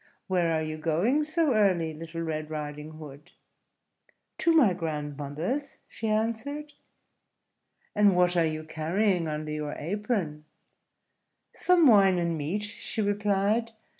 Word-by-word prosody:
"Where 175 -3 +1
are 160 -1 0
you 155 0 -5
going 175 - +1
so 315 -2 +1
early, 185 -7 +2
Little 165 +1 -7
Red 155 -1 -3
Riding 150 0 -6
Hood?" 150 +1 -12 1.1
"To 335 +1 +3
my 280 - +5
grandmother's," 155 - -4
she 225 - -5
answered. 230 +8 -2 1.2
"And 205 -2 +5
what 180 0 +3
are 170 - +4
you 155 0 -4
carrying 165 +3 0
under 155 0 -4
your 150 -1 -3
apron?" 180 -4 -2 1.1
"Some 360 -2 +4
wine 195 -7 +6
and 170 -1 0
meat," 160 +8 -2
she 210 +1 -5
replied. 205 +2 +1
175 Hz, 125 wpm, -28 LUFS, 155-215 Hz, 1.2 s, wine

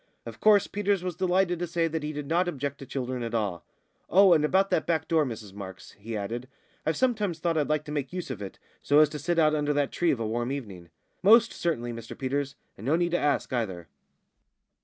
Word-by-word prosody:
Of - - -9
course 210 -2 +5
Peters 200 -2 0
was 180 -2 -3
delighted 180 -1 +1
to 175 - -2
say 165 0 0
that 160 0 -3
he 150 +1 -3
did 150 -1 -5
not 170 +5 +1
object 140 -4 -3
to 135 - -9
children 130 -2 -3
at 115 -1 -3
all. 100 -7 -1 0.5
"Oh, 190 +1 +7
and 155 -3 +3
about 190 +5 +2
that 160 - +1
back 160 -2 0
door, 160 -3 +2
Mrs 110 -5 -7
Marks," 95 -2 -9
he 110 +2 -6
added. 115 +5 -4 0.4
"I've 160 - +1
sometimes 215 -9 +1
thought 165 0 -1
I'd 150 -2 0
like 150 0 0
to 150 - -7
make 145 -3 -3
use 180 -6 -5
of 110 -5 -6
it, 95 - -7 0.2
so 145 - +3
as 155 -1 +7
to 150 - -6
sit 170 +4 -1
out 155 -2 +4
under 150 -1 +1
that 145 -1 0
tree 175 - +1
of 130 - +1
a 115 - -2
warm 120 +3 -2
evening." 100 -11 -6 0.3
"Most 230 +4 +6
certainly, 120 -8 -2
Mr 115 0 -8
Peters, 140 +1 -2 0.2
and 110 - -8
no 150 - +4
need 175 0 +1
to 175 - +2
ask 145 -2 0
either." 95 -9 -3
150 Hz, 235 wpm, -27 LUFS, 120-175 Hz, 0.5 s, Oh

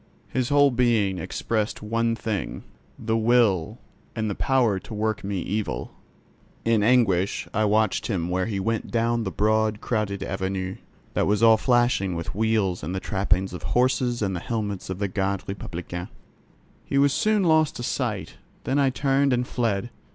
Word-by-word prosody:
His 130 -1 -1
whole 145 -1 +5
being 115 -6 +2
expressed 105 +6 -2
one 115 +2 0
thing: 105 -6 -4 0.3
the 110 -1 -1
will, 110 -7 +2 0.4
and 110 -2 -1
the - - -1
power 120 -5 +2
to 110 - -10
work 110 0 -1
me 100 -2 -2
evil. 95 - -3 0.7
In 115 -2 +3
anguish 105 -5 +2
I 110 - +2
watched 110 +1 +1
him 90 -7 -1
where 90 +2 -1
he 100 -3 -2
went 115 +3 -2
down 115 0 0
the - - -1
broad 110 +1 +1
crowded 105 -5 -2
Avenue, 95 -1 -3 0.4
that - - +1
was 105 +2 +2
all 115 -1 +8
flashing 120 -6 +2
with 85 0 -4
wheels 105 -4 +1
and 85 +6 -4
the - - -1
trappings 95 -1 0
of 90 - -6
horses 125 -2 +1
and 95 -2 -1
the - - -2
helmets 105 -2 -4
of 95 - -3
the 100 +1 -1
Garde 95 0 -1
Republicaine. 90 -2 -6 0.7
He 140 - -2
was 140 -1 +4
soon 215 -2 +2
lost 160 -3 +3
to 120 - -5
sight; - - -3 0.3
then 135 +2 0
I 135 -1 +4
turned 135 +1 +1
and 125 0 0
fled. 115 -1 -1
110 Hz, 170 wpm, -25 LUFS, 95-120 Hz, 0.7 s, all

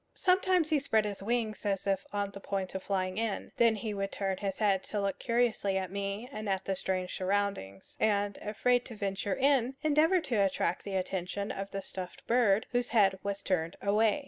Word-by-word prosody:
Sometimes 365 -3 +3
he 305 - +4
spread 225 -6 +2
his 205 -2 -4
wings 220 0 -1
as 195 -2 -1
if 195 -1 0
on 205 -1 -1
the 200 - -9
point 195 -1 -3
of 190 - -3
flying 185 0 -1
in; 225 -3 -2
then 230 -2 +5
he 215 0 -3
would 195 0 -2
turn 195 -1 -2
his 195 -1 -3
head 200 -3 +2
to 210 - -2
look 200 -1 -1
curiously 230 -5 +1
at 185 -1 -3
me 200 +3 -3
and 215 -5 -5
at 190 -1 -1
the 195 - 0
strange 185 -1 -2
surroundings, 190 - -2
and, 205 -2 +1
afraid 245 +4 +1
to 235 - -8
venture 195 -1 -2
in, 270 -2 +2
endeavor 310 +4 +4
to 250 -8 -2
attract 195 -1 0
the 200 -1 -3
attention 190 +2 -2
of 195 0 -5
the 195 -1 -5
stuffed 185 -1 -8
bird, 225 -4 +3
whose 245 0 0
head 195 -4 +4
was 200 0 -3
turned 170 -3 0
away. 210 +5 +2
200 Hz, 200 wpm, -31 LUFS, 195-230 Hz, -, then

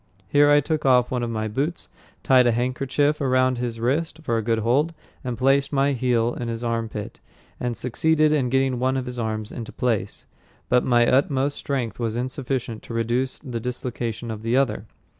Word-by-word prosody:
Here 145 +6 +4
I 145 0 +6
took 155 +1 -2
off 125 -2 +4
one 125 -1 -1
of 120 - -2
my 110 -1 -2
boots, 140 +10 -3 0.4
tied 130 -3 +5
a - - +4
handkerchief 135 +5 0
around 130 -2 +2
his 120 -2 -3
wrist 150 +7 -1
for 115 - 0
a 115 - +1
good 115 +1 0
hold, 135 +9 +1 0.4
placed 135 +2 +2
my 140 0 +2
heel 120 -2 +1
in 120 - -5
his 115 0 -4
arm 115 -1 -1
pit, 105 -1 -7 0.4
and 120 -1 -2
succeeded 155 +4 +2
in 135 -5 +1
getting 135 -1 +1
one 130 +1 +1
of 130 - -2
his 125 -1 -5
arms 110 -1 -3
into 115 -2 -7
place, 110 -5 -2 0.4
but 125 0 +4
my 120 -1 +4
utmost 135 +2 +2
strength 125 -7 -3
was 115 -2 -1
insufficient 125 -2 -3
to 115 - -8
reduce 120 +3 0
the 125 -5 -5
dislocation 120 -1 -4
of 110 -1 -6
the 115 +3 +1
other. 110 -6 0
125 Hz, 190 wpm, -23 LUFS, 115-135 Hz, 0.4 s, I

